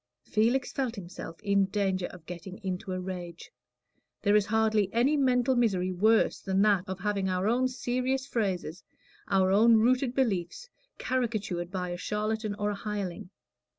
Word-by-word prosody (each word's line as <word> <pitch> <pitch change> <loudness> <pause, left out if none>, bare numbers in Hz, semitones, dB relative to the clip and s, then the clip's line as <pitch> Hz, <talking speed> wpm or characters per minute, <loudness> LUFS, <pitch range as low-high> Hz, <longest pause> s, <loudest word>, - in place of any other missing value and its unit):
Felix 240 +5 +1
felt 255 -4 -2
himself 175 -3 -8
in 200 -1 +3
danger 190 -2 -1
of 175 -3 -13
getting 180 +2 -8
into 185 0 -4
a 185 - -2
rage. 180 -2 -7 0.7
There 205 0 +4
is 210 -1 +3
hardly 220 -2 +2
any 250 +6 +3
mental 260 -2 +2
misery 190 -7 +1
worse 215 +5 +3
than 195 0 +1
that 200 -3 +3
of 190 -1 -5
having 200 -2 0
our 185 +2 0
own 250 +3 +2
serious 255 +1 -1
phrases, 190 - -2 0.4
our 190 -1 +3
own 225 +4 +6
rooted 250 +3 +2
beliefs, 220 - -1 0.3
caricatured 215 -9 -2
by 180 -1 -3
a 175 - -4
charlatan 215 +2 -2
or 205 0 -1
a - - -3
hireling. 200 -4 -5
205 Hz, 155 wpm, -29 LUFS, 185-235 Hz, 0.7 s, own